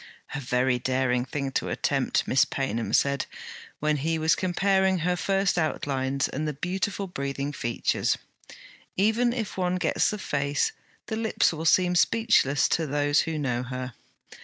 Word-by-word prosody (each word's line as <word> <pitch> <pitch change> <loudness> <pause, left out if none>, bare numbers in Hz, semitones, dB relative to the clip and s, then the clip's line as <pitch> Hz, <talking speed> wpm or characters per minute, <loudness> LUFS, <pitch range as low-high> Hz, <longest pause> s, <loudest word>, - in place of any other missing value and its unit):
'A 145 - -2
very 125 -1 +1
daring 130 -1 +1
thing 135 +1 -3
to - - -1
attempt,' - - 0
Miss 130 - +4
Paynham 115 -4 -2
said, 140 0 +2 0.5
when 150 0 +1
he 160 +3 0
was 160 0 +3
comparing 190 +2 +2
her 180 +1 0
first 195 0 +1
outlines 135 -3 -1
and 155 +3 -3
the 150 - -2
beautiful 190 +6 -2
breathing 140 -4 -4
features. 120 -4 0 0.8
'Even 225 +5 +3
if 230 -6 -4
one 180 -1 0
gets 175 -3 +1
the 210 - -3
face, 140 -5 0 0.3
the 220 - -4
lips 220 -5 +1
will 160 0 -5
seem 180 +1 +4
speechless, 220 - +3
to 165 -2 0
those 145 0 +2
who 160 -1 -1
know 125 -5 -1
her.' 125 0 -5
150 Hz, 155 wpm, -26 LUFS, 135-185 Hz, 0.8 s, Miss